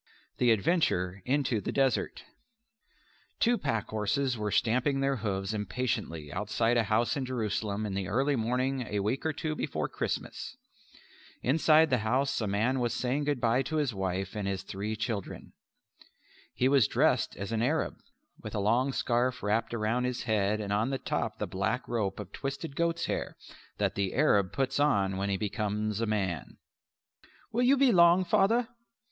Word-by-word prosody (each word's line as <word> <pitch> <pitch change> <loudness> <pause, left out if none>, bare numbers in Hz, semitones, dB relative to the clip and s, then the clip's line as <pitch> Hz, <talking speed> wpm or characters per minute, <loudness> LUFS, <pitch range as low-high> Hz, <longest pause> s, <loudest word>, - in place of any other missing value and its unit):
The 125 - +4
Adventure 100 - +1
into 130 -5 +1
the - - -3
Desert 135 -2 0 1.2
Two 240 +1 +4
pack 115 - -2
horses 120 +5 0
were 105 -2 -2
stamping 125 +6 +1
their 135 0 +1
hoofs 100 -2 -2
impatiently 105 - -3
outside 115 +4 0
a 115 -2 +3
house 110 +3 +1
in 140 - -2
Jerusalem 110 -4 -2
in 100 - -3
the 95 -1 -2
early 135 +8 +1
morning 125 +3 0
a 105 -1 -1
week 110 +7 -1
or - - +1
two 155 +1 -3
before - - -2
Christmas. - - -4 0.9
Inside 155 +2 +4
the 130 - +3
house 125 +5 0
a 110 - -1
man 115 +7 +1
was 120 -1 0
saying 135 +4 -1
good 145 -3 0
bye 120 +2 +2
to 145 +4 -4
his 145 -6 +1
wife 95 0 -3
and 105 -2 -2
his 95 -1 -2
three 100 +3 -4
children. 110 -3 -5 1.0
He 125 - +1
was 135 -5 +4
dressed - - +2
as 100 +2 -5
an 115 -1 0
Arab, 150 +7 0 0.4
with - - -7
a - - 0
long 120 +7 +2
scarf 125 +1 0
wrapped 110 +2 0
about 115 +2 0
his 125 -1 -2
head 105 -1 +1
and 100 -1 -2
on 110 +5 +1
the 135 - -1
top - - -2
the - - -2
black 110 +7 -2
rope 105 -5 -2
of 105 - -7
twisted 140 +2 -5
goats' 170 +1 0
hair - - -3 0.4
that - - 0
the 100 -2 -2
Arab 105 -9 +3
puts 135 0 -1
on 100 -10 +2
when 100 +1 -1
he 100 - 0
becomes 105 +1 -2
a 115 - 0
man. 95 -8 -2 0.9
"Will 240 - 0
you 260 +3 +5
be 265 -2 +5
long, 175 0 +6
Father?" 225 +7 +3
115 Hz, 175 wpm, -29 LUFS, 105-135 Hz, 1.2 s, long